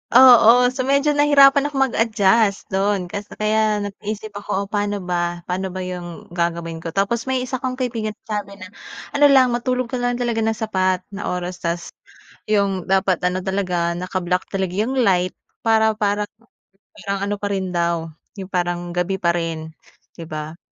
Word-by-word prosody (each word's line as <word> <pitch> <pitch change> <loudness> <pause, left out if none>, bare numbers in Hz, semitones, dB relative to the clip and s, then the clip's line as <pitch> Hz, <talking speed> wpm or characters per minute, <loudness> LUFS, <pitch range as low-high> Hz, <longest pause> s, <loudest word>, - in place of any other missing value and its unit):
Oo, 245 -1 +8
so 255 0 -3
medyo 280 +2 +3
nahirapan 285 -1 +5
akong 275 -2 +1
mag-adjust 210 -2 +2
do'n 195 -2 0
kas 205 0 -5
kaya 215 -1 +1
nag-iisip 210 +1 -6
ako 200 -1 -2
o - - -6
paano 205 -2 -1
ba 175 -1 -2
paano 185 +2 -3
ba 185 0 -5
'yong 175 -2 -7
gagawin 170 -1 -2
ko? 165 +1 -7
Tapos 230 +5 0
may 260 -1 0
isa 255 0 -4
'kong 255 -1 -3
kaibigan 230 -4 -3
nagsabi 205 -2 -5
na, 185 -1 -11 0.4
"Ano 290 0 +5
lang 260 -3 +5
matulog 250 +1 -1
ka 255 - -2
lang 245 0 0
talaga 240 -2 -1
ng 225 0 0
sapat 185 -4 0
na 200 0 -5
oras 180 0 -4
tas 170 0 -3 0.6
'yong 195 -3 0
dapat 190 -2 +2
ano 180 +1 -1
talaga, 180 -3 0
naka-block 180 0 -2
talaga 190 -2 -2
'yong 235 +7 -1
light," 180 -1 +1 0.2
para 220 -1 +3
parang 210 -1 0 0.7
parang 200 -1 -4
ano 205 - -1
pa 205 - -1
rin 190 -2 -2
daw, 170 -2 -1 0.2
'yong 195 0 -8
parang 175 -1 -2
gabi 180 +2 -1
pa 170 -2 +1
rin, 160 -2 -4 0.4
'di 165 -1 -10
ba. 155 +1 -6
200 Hz, 170 wpm, -21 LUFS, 180-225 Hz, 0.7 s, Oo